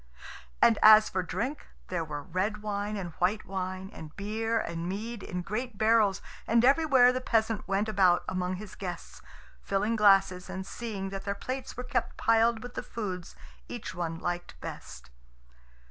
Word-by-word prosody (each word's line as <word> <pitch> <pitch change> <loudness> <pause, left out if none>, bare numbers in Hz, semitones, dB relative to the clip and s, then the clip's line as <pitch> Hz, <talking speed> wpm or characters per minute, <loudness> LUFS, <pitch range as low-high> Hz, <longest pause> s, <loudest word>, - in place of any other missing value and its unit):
And 230 -2 +5
as 215 0 +8
for 185 - -1
drink, 245 - -4 0.2
there 175 -2 -1
were 150 -2 -6
red 195 +5 -2
wine 210 0 -2
and 180 -3 -5
white 195 +5 +1
wine, 185 0 -4
and 155 -1 -10
beer 225 +3 -1
and 170 -3 -4
mead 220 +3 -4
in 180 -1 -4
great 230 +3 -4
barrels, 215 -3 +3 0.2
and 230 +1 +4
everywhere 270 -3 +5
the 255 - -2
peasant 225 -3 0
went 195 +2 0
about 190 -4 +3
among 185 0 -1
his 200 +1 -9
guests, 180 -3 -7 0.4
filling 205 +3 0
glasses 195 -3 +4
and 190 0 -5
seeing 200 -4 -5
that 195 0 -6
their 200 0 -1
plates 255 +4 -5
were 250 - -4
kept 250 - -2
piled 230 0 +3
with 245 0 -8
the - - -3
foods 185 -6 -6 0.3
each 210 -8 -6
one 170 -2 -3
liked 175 - -4
best. 65 - -9
200 Hz, 165 wpm, -29 LUFS, 185-225 Hz, 0.4 s, as